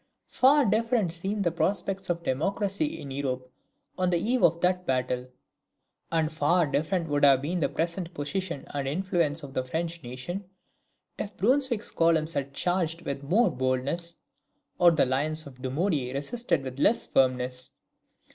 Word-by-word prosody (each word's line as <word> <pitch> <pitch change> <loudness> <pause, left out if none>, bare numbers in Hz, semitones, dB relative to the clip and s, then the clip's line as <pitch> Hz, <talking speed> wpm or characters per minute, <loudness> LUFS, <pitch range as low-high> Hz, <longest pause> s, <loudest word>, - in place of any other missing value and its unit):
Far 280 +2 +5
different 220 -2 +1
seemed 195 +5 -1
the 170 - +1
prospects 195 +2 -1
of 170 -1 -1
democracy 200 - -1
in 140 - -8
Europe 130 -2 -3 0.5
on 185 -1 +2
the 175 - +3
eve 240 +8 +1
of 170 0 +4
that 180 0 +2
battle; 125 -1 -1 0.8
and 160 -1 +1
far 160 +3 +2
different 160 +4 -1
would 145 -1 0
have 135 -1 +6
been 175 +5 -1
the 155 - +1
present 170 +1 -2
position 170 0 -3
and 140 -2 -2
influence 165 -1 0
of 135 -2 -8
the 130 - -1
French 165 +5 -3
nation, 135 +10 -6 0.7
if 205 -1 -5
Brunswick's 245 +1 +1
columns 165 -1 +2
had 140 0 -2
charged 170 +2 -1
with 140 0 -4
more 190 +8 +3
boldness, 135 +6 -2 0.6
or 175 - +8
the 160 -5 +3
lines 150 +5 0
of 130 -3 -12
Dumouriez 135 -1 -1
resisted 170 - -1
with 130 0 -7
less 215 +10 +3
firmness. 125 -1 +1
165 Hz, 155 wpm, -27 LUFS, 140-190 Hz, 0.8 s, or